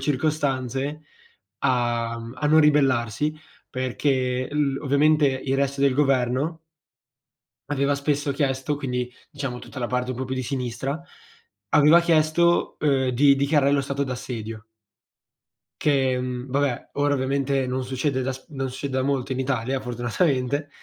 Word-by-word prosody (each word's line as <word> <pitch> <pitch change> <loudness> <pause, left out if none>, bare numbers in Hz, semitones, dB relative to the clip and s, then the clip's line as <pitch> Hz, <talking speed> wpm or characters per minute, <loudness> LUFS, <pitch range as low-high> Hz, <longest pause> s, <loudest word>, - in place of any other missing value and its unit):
circostanze 140 0 -1 0.6
a 120 -2 0
a 115 +5 -4
non 155 +2 +6
ribellarsi, 145 -2 +2 0.3
perché 130 0 -1
l 145 -2 0
ovviamente 150 +1 +3
il 130 0 -2
resto 140 0 -1
del 140 -2 +3
governo 135 +3 +1 1.1
aveva 140 0 +1
spesso 140 0 -1
chiesto, 135 0 -1
quindi 125 -3 -3 0.2
diciamo 140 -5 -4
tutta 135 - -9
la 120 - -1
parte 125 +1 -1
un 130 - -4
po' 130 - -3
più 130 0 -3
di 130 - -2
sinistra, 130 +3 -3 0.7
aveva 150 +4 +6
chiesto, 170 +1 +2
uhm, 135 -3 +2
di 140 +3 +5
dichiarare 140 0 +3
lo 140 - +3
stato 140 0 -2
d'assedio. 115 -4 -6 1.2
Che, 130 -3 +2
mhmm, 125 0 -5
vabbè, 135 -2 -1
ora 145 0 +2
ovviamente 135 0 0
non 130 +1 -2
succede 130 +1 -1
da 130 +1 -1
s 130 - -12
non 135 -3 -3
succede 130 +1 -3
da - - +1
molto 135 -1 -1
in 130 - -3
Italia 130 0 -1
fortunatamente, 130 +3 -1
135 Hz, 140 wpm, -24 LUFS, 125-145 Hz, 1.2 s, non